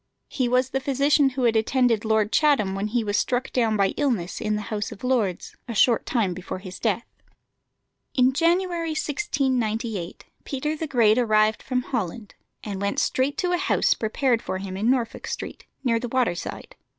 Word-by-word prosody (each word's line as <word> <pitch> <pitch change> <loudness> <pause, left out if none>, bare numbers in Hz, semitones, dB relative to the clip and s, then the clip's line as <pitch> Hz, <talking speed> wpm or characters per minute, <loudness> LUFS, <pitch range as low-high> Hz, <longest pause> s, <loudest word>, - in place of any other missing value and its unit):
He 255 -3 -1
was 255 +1 +2
the 270 - 0
physician 280 +1 +3
who 260 0 -3
had 230 -2 +3
attended 230 0 +2
Lord 220 -1 +1
Chatham 280 -11 +3
when 195 +2 -2
he 235 +2 0
was 205 -1 0
struck 255 +1 0
down 225 -4 +2
by 195 -1 +3
illness 235 -12 -1
in 215 -1 0
the 210 - -3
House 210 -1 -3
of - - -11
Lords, 235 -8 -1
a 235 - -5
short 240 -1 +3
time 215 -8 +1
before 185 +1 -6
his 185 -1 -9
death. 225 +1 0 1.1
In 255 0 +4
January 335 +1 +1
1698 245 - -2 0.2
Peter 300 +3 -2
the 315 +1 -4
Great 235 -4 +4
arrived 215 -2 +3
from 250 -1 -1
Holland, 215 -3 -4 0.3
and 200 -2 -5
went 200 0 -1
straight 265 +2 +1
to 360 -1 0
a 355 - +2
house - - +2
prepared 235 +2 0
for 190 - -3
him 190 0 -6
in 210 +5 0
Norfolk 245 -3 -1
Street, - - -6 0.2
near 230 -3 +2
the 245 - -5
water 250 -6 +1
side. 175 - -7
235 Hz, 185 wpm, -24 LUFS, 210-265 Hz, 1.1 s, In